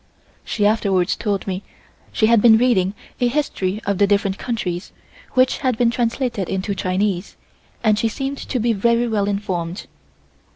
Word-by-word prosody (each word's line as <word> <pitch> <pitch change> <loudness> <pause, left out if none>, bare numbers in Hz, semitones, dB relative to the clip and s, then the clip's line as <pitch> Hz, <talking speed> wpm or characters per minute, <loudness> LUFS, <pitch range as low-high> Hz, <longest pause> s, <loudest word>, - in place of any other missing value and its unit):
She 205 - -1
afterwards 200 -4 +2
told 205 -3 -2
me 185 -1 -3 0.5
she 220 - +2
had 230 -1 +5
been 225 -1 +7
reading 210 -6 +2 0.2
a 245 - +3
history 225 -8 -1
of 200 -2 -1
the 200 - +5
different 200 -1 +1
countries, 190 -7 -3 0.4
which 255 0 +3
had 255 -4 0
been 235 -1 +3
translated 235 -4 -1
into 190 +1 -2
Chinese, 185 0 -1 0.5
and 215 -2 +3
she 230 - +2
seemed 270 +5 -4
to 255 - -3
be 230 +1 +2
very 235 +3 +2
well 210 -3 0
informed. 190 -3 -3
210 Hz, 160 wpm, -20 LUFS, 195-235 Hz, 0.5 s, been